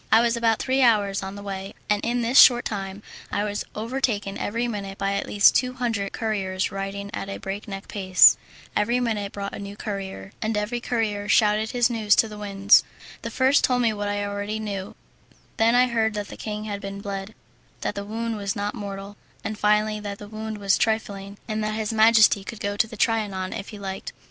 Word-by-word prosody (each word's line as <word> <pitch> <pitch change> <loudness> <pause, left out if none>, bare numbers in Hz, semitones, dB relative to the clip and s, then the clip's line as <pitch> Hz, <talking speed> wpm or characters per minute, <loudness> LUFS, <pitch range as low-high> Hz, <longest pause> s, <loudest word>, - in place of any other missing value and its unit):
I 225 - +7
was 235 0 +2
about 230 -2 +2
three 265 +1 0
hours 205 -5 +3
on 190 +1 -6
the 200 - -8
way, 195 -1 -6
and 210 0 +1
in 240 +1 0
this 240 +4 +5
short 245 -1 +8
time 195 -1 -4 0.3
I 205 - 0
was 205 -1 -2
overtaken 220 -3 -1
every 230 +3 -2
minute 200 -4 -5
by 195 0 -1
at 200 - -2
least 205 -1 +5
two 255 0 +1
hundred 225 -6 -2
couriers 195 -4 -2
riding 195 +1 -5
at 195 - -4
a 195 - -4
breakneck 195 0 -6
pace. 185 -2 +6 0.4
Every 235 +4 +2
minute 215 -5 -1
brought 200 0 -5
a - - -6
new 200 0 -8
courier, 195 -2 -6
and 220 -1 -1
every 210 +4 -1
courier 215 -4 -2
shouted 215 0 +3
his 245 -1 +2
news 215 -3 +3
to 225 - +3
the 210 -1 -9
winds. 200 0 +4 0.4
The - - -4
first 265 +2 +3
told 250 -1 +2
me 225 -2 +2
what 205 -1 -3
I 205 0 -1
already 205 +1 -3
knew; 200 -3 -5 0.6
then 230 +2 +4
I 250 +1 +6
heard 225 -3 0
that 205 -1 -4
the - - -8
king 210 -1 -5
had 205 -2 -5
been 195 0 -6
bled, 200 +1 -5 0.5
that - - -1
the 200 - -5
wound 225 +2 -3
was 200 -1 -2
not 205 0 -2
mortal, 200 -2 -7 0.3
and 215 - -3
finally, 210 0 +2
that 205 -1 -6
the 205 - -10
wound 220 0 -6
was 200 -1 +2
trifling, 200 -3 -1
and 215 -1 -2
that 215 0 -1
his 220 0 -2
majesty 220 -2 +5
could 220 +2 -8
go 205 0 -2
to 215 - +2
the 225 -1 -10
Trianon 200 -4 0
if 195 - -6
he 210 - -9
liked. 195 -1 -6
210 Hz, 210 wpm, -24 LUFS, 200-225 Hz, 0.6 s, short